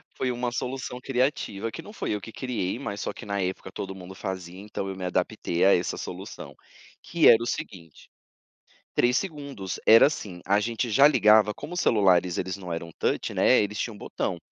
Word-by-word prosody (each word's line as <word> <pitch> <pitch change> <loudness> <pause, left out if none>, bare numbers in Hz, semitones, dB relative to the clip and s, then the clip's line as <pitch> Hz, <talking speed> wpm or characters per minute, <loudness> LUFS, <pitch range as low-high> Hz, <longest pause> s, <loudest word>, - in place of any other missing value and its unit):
Foi 130 - -1
uma 120 0 -2
solução 125 0 -4
criativa 125 -5 -1
que 165 - -7
não 210 - -12
foi 220 - -4
eu 105 - -3
que 115 - -9
criei, 115 -7 -3
mas 105 -6 -5
só - - -2
que - - -11
na 100 -1 -2
época 95 0 -4
todo 95 0 -6
mundo 95 0 -10
fazia, 95 -1 -6
então 100 -1 -5
eu 95 - -4
me 95 - -7
adaptei 90 -1 0
a 100 - +7
essa 90 - -2
solução, - - -8 0.5
que 170 -2 +3
era 115 -1 +8
o 120 - -3
seguinte, 95 - -7 0.8
3 125 +2 +3
segundos. 140 - -5
Era 115 +4 +9
assim, 95 -11 -6
a 100 +2 +3
gente 115 +3 -2
já 135 +6 +7
ligava 105 -6 +5
como 175 - -8
os - - -1
celulares, 90 - +3
eles 95 +1 -3
não 90 -3 -6
eram 85 0 -5
touch, - - -1
né, - - +4
eles 105 0 -3
tinham 115 - -3
um - - -12
botão 90 -2 -3
105 Hz, 205 wpm, -26 LUFS, 95-125 Hz, 0.8 s, Era